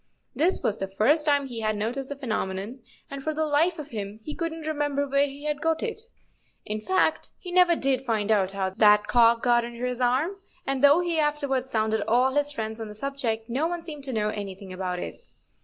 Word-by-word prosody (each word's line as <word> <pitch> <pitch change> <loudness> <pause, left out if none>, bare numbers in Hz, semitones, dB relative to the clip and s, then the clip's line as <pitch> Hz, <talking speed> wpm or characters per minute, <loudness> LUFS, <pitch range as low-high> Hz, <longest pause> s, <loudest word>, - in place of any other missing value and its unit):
This 340 +6 +2
was 210 - 0
the 195 - -2
first 280 +11 +2
time 285 -1 +3
he 240 -4 -6
had 215 -1 0
noticed 240 +6 -3
the 285 - -4
phenomenon, 215 -3 -3 0.3
and 275 0 -5
for 310 +2 -2
the 315 0 +1
life 315 +4 +2
of 300 -1 -7
him 205 -3 -5
he 300 - -5
couldn't 325 -1 -4
remember 290 -2 -1
where 280 +1 +2
he 280 +1 -10
had 300 -1 -2
got 325 0 0
it. 450 -2 -3 0.6
In 215 +1 -3
fact, 375 +13 +1
he 360 - -8
never 355 -1 +5
did 265 -4 +1
find 220 -4 0
out 195 -3 +3
how 195 -1 -2
that 210 +2 +5
cock 230 -1 +4
got 240 -1 +4
under 240 +1 -5
his 250 0 -2
arm; 270 +11 +1 0.3
and 270 0 -1
though 290 +4 +7
he 340 -2 0
afterwards 285 -4 0
sounded 220 -2 0
all 250 +4 +3
his 290 0 +1
friends 220 -3 -4
on 220 - -4
the 210 - -9
subject, 230 -3 -2
no 265 +7 0
one 345 -1 -4
seemed 300 -4 -7
to 265 - -4
know 215 -3 0
any¬ 200 -3 -6
thing 195 -2 -10
about 185 -1 -3
it. 475 - -7
265 Hz, 225 wpm, -26 LUFS, 220-295 Hz, 0.6 s, though